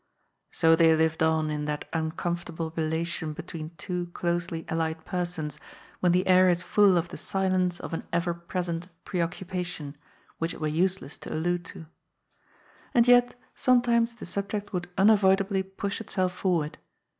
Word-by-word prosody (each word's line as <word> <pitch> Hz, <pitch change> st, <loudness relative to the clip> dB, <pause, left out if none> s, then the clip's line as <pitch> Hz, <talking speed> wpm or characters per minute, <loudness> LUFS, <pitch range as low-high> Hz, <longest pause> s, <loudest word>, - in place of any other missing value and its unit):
So 165 Hz, 0 st, +4 dB
they 160 Hz, -1 st, +5 dB
lived 160 Hz, 0 st, +1 dB
on 160 Hz, -1 st, +2 dB
in 150 Hz, 0 st, -2 dB
that 150 Hz, 0 st, -3 dB
uncomfortable 165 Hz, 0 st, -3 dB
relation 160 Hz, 0 st, -1 dB
between 160 Hz, -1 st, -7 dB
two 180 Hz, -2 st, -3 dB
closely 170 Hz, -1 st, -2 dB
allied 160 Hz, 0 st, -2 dB
persons 170 Hz, -5 st, -3 dB, 0.4 s
when 180 Hz, -, +3 dB
the 180 Hz, +2 st, +2 dB
air 185 Hz, 0 st, +6 dB
is 175 Hz, 0 st, +1 dB
full 200 Hz, -3 st, +4 dB
of 170 Hz, 0 st, -1 dB
the -, -, -8 dB
silence 185 Hz, -2 st, 0 dB
of -, -, -7 dB
an 165 Hz, -, -4 dB
everpresent 170 Hz, 0 st, -2 dB, 0.2 s
preoccupation, 175 Hz, -4 st, -3 dB, 0.4 s
which 165 Hz, 0 st, -2 dB
it -, -, -11 dB
were 155 Hz, -, -1 dB
useless 170 Hz, -1 st, 0 dB
to -, -, -8 dB
allude 175 Hz, +2 st, 0 dB
to. 165 Hz, -, -9 dB, 1.1 s
And 240 Hz, 0 st, +5 dB
yet 245 Hz, 0 st, +5 dB, 0.2 s
sometimes 235 Hz, -2 st, +3 dB
the 230 Hz, -, -9 dB
subject 205 Hz, +1 st, -4 dB
would 175 Hz, -1 st, -3 dB
unavoid 195 Hz, -1 st, +5 dB
ably 195 Hz, 0 st, 0 dB
push 195 Hz, +2 st, -4 dB
itself 185 Hz, -4 st, -1 dB
forward. 175 Hz, -5 st, -1 dB
175 Hz, 150 wpm, -27 LUFS, 160-190 Hz, 1.1 s, air